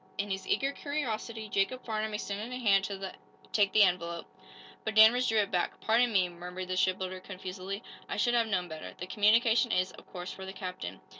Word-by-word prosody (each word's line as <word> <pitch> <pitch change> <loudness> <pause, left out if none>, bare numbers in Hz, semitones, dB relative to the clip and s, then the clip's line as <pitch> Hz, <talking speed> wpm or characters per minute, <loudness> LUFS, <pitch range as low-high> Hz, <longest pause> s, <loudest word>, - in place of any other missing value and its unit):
In 200 0 -2
his 190 0 -3
eager 275 +1 +1
curiosity 230 -7 -3
Jacob 200 +6 0
Farnum 215 -1 -2
extended 210 +3 -4
a 250 - -3
hand 200 -5 +4
to 195 -1 -5 0.4
take 205 -2 +3
the 215 - +6
envelope, 170 -2 0 0.6
but 220 0 -3
Danvers 225 +4 +7
drew 225 - +2
it 205 -2 +2
back. 180 -1 -1
"Pardon 235 +2 +3
me," 190 -4 +3
murmured 180 +1 -7
the 185 - -1
shipbuilder, 185 0 0
confusedly. 190 +2 -6 0.3
"I - - -3
should 240 - +2
have 235 -2 +3
known 185 -4 0
better. 155 -1 -8
The 180 - -5
communication 225 +4 +4
is, 185 +1 +1
of - - -16
course, 180 0 -6
for 190 - -8
the 190 0 -6
captain." 180 - -6
200 Hz, 200 wpm, -30 LUFS, 185-220 Hz, 0.6 s, Danvers